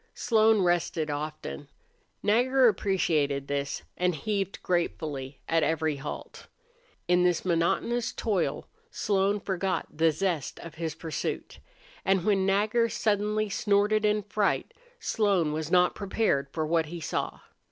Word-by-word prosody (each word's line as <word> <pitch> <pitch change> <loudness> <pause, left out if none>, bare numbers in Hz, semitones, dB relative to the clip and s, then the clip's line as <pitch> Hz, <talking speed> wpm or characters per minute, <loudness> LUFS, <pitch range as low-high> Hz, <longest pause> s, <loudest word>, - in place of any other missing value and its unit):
Slone 220 -3 +3
rested 170 -3 +1
often. 145 - -5 0.6
Nagger 250 +5 +4
appreciated 160 -9 +1
this 140 0 -2
and 180 -1 +1
heaved 195 +4 -3
gratefully 150 -6 -2
at 165 0 +2
every 160 -2 0
halt. 140 +2 -8 0.6
In 180 0 +4
this 180 -1 +1
monotonous 185 +8 +1
toil 200 -6 -1 0.2
Slone 200 - +1
forgot 190 -1 -1
the 165 +1 +4
zest 165 -4 -2
of 165 - -9
his 160 -1 -4
pursuit. 160 -2 -4 0.4
And 190 -1 +2
when 195 -3 +2
Nagger 215 +4 +2
suddenly 210 0 0
snorted 205 +1 +2
in 210 0 +2
fright 205 0 0 0.3
Slone 195 -8 +1
was 155 0 -3
not 180 0 +4
prepared 195 -8 0
for 155 +1 -2
what 160 0 +1
he 170 +2 -6
saw. 160 - -3
180 Hz, 130 wpm, -28 LUFS, 160-210 Hz, 0.6 s, Nagger